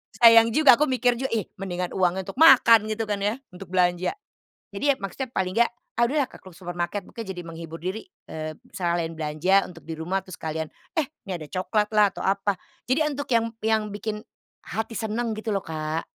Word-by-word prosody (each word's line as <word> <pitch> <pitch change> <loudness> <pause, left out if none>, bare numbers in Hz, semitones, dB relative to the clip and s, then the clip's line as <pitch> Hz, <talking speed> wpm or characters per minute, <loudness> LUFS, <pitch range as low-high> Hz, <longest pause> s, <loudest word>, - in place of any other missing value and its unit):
Sayang 230 -1 +7
juga 295 -4 +7
aku 300 - +3
mikir 245 -2 +1
juga, 265 - -1
ih 215 - -1
mendingan 180 -2 -3
uangnya 185 0 +1
untuk 195 - -8
makan 235 -8 +7
gitu 220 +1 -2
kan 205 -2 -2
ya, 205 +3 0 0.2
untuk 180 +1 -10
belanja. 180 - +1 0.6
Jadi 200 +7 -5
ya - - +5
maksudnya 235 +7 -5
paling 185 -5 -1
enggak, 235 0 +3 0.2
ah 235 - 0
udahlah 285 0 +1
ke - - -14
supermarket, 175 +2 -4
makanya 225 -4 -8
jadi 175 - -5
menghibur 165 0 -8
diri, 185 +6 -4 0.2
eee, 155 0 -6 0.2
sekalian 170 -4 -1
belanja 160 +5 +2
untuk 180 - -13
di 160 - -4
rumah 180 +4 -2
terus 185 - -9
sekalian, 160 0 -3 0.3
eh, 310 -4 +2 0.2
ini - - -2
ada 155 - -8
coklat 190 +5 0
lah 210 -1 +6
atau - - -7
apa. 195 0 +1 0.3
Jadi 260 +4 +2
untuk 285 +1 -5
yang 230 -1 +3 0.2
yang 220 0 +2
bikin 210 +1 -4 0.4
hati 220 +3 -4
seneng 225 0 -2
gitu 215 0 -3
loh, 195 - -1
Kak. 155 -1 -3
195 Hz, 195 wpm, -25 LUFS, 175-230 Hz, 0.6 s, Sayang